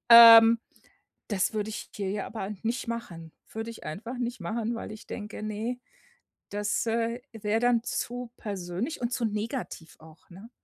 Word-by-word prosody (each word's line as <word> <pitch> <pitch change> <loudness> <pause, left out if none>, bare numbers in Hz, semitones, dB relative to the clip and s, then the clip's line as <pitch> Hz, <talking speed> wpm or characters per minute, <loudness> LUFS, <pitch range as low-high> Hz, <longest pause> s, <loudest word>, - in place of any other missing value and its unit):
Ähm, 230 0 +11 0.7
das 200 0 +1
würde 215 0 -1
ich - - -7
hier, 195 -2 -2
ja, 205 -1 -3
aber 205 -3 -5
nicht 230 +2 -2
machen. 175 -9 -6 0.2
Würde 225 +1 -4
ich 230 - -11
einfach 230 +11 -5
nicht 240 -3 -3
machen, 225 +6 -2
weil 215 - -6
ich 215 - -11
denke: 210 0 -6
„Ne, 220 +4 -3 0.7
das, 205 +3 -1
äh, 230 +1 0
wäre 220 0 -1
dann 240 -1 +3
zu 245 -1 -3
persönlich 200 - -4
und 240 0 -1
zu 245 - -1
negativ 215 - -4
auch,“ 160 +2 -17
ne? 195 +6 -12
225 Hz, 165 wpm, -28 LUFS, 205-235 Hz, 0.7 s, Ähm